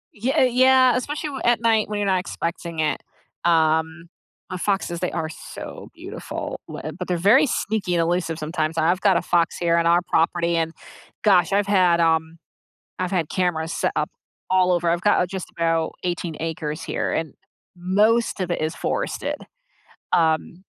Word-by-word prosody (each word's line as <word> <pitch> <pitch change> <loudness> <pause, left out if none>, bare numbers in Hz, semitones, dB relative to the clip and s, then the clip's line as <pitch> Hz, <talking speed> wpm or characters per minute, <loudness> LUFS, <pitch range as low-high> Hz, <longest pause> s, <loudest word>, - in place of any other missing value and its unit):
Ye 230 +5 -1
uh, 315 - +3
yeah, 255 0 +5
especially 295 +4 -3
w 270 -2 -6
at 240 -2 +3
night 225 -2 +3
when 210 -1 -3
you're 205 - 0
not 190 -1 +2
expecting 170 -2 -5
it 155 -1 0 0.4
um 160 0 +2 0.4
But 185 - -5
foxes, 190 -3 -1
they 180 - -2
are 160 -1 -3
so - - -9
beautiful, - - -6
w - - -7
eb 155 +1 -6
but 180 - -5
they're 180 - 0
very 275 +5 +6
sneaky 205 -7 -1
and 170 - +2
elusive 165 -1 -1
sometimes. 155 0 -2
I've 170 +3 +2
got 195 -2 +4
a - - 0
fox 170 -1 +1
here 170 -1 +2
on 170 - +2
our 170 +1 +4
property 170 +1 +1
and 165 0 -1 0.5
gosh, 190 -3 +4
I've 200 0 +2
had, 180 -4 +4
um 160 0 +1 0.6
I've 185 -1 -2
had 170 -5 0
cameras 165 -3 -1
set - - 0
up - - 0 0.4
all 185 0 +3
over. 175 -1 +1
I've 170 +1 0
got, 205 - +3
uh, - - +2
just 185 0 -6
about 165 -1 0
18 175 -2 -3
acres 160 -1 -4
here - - -2
and 160 -4 -2 0.4
most 205 +6 +2
of 180 -2 -2
it - - -1
is 155 +1 -2
forested, - - -2 0.8
um, 165 +2 +1
175 Hz, 180 wpm, -23 LUFS, 165-195 Hz, 0.8 s, very